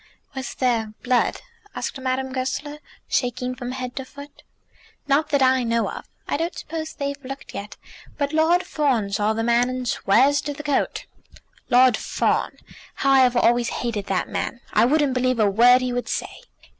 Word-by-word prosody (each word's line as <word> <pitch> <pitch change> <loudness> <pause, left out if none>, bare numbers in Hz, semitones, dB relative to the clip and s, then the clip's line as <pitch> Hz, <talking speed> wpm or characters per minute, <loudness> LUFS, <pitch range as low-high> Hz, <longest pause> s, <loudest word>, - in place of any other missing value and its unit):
"Was 265 -2 -6
there 230 -4 0
blood?" 250 -1 +1 0.3
asked - - -4
Madame 260 0 -2
Goesler, 275 +3 -3 0.3
shaking 250 0 -1
from 250 -1 -6
head 255 -1 -5
to 265 - -2
foot. 285 +2 -13 0.7
"Not 295 +2 +2
that 285 -3 +3
I 260 0 +4
know. 230 -1 0 0.4
I - - 0
don't 335 +3 -3
suppose 315 0 -5
they've 280 -1 -4
looked 270 +1 -8
yet. 200 +1 -7 0.4
But 285 0 -1
Lord 330 +3 +3
Fawn 255 -10 0
saw 210 +2 +1
the 225 +1 -2
man, 235 +1 +3
and 255 -1 -4
swears 265 +7 +3
to 290 -1 -5
the 295 - -8
coat." 290 -2 -1 0.6
"Lord 250 -1 +6
Fawn! - - -1 0.4
How 275 - +1
I 270 - +6
have 250 -1 +4
always 240 +1 +3
hated 220 -5 -3
that 190 -2 -1
man! 240 - -4
I - - +5
wouldn't 290 0 +2
believe 255 -1 +1
a 215 - +4
word 240 +5 +5
he 250 -1 -2
would 245 0 -3
say." - - -4
255 Hz, 175 wpm, -23 LUFS, 240-280 Hz, 0.7 s, Lord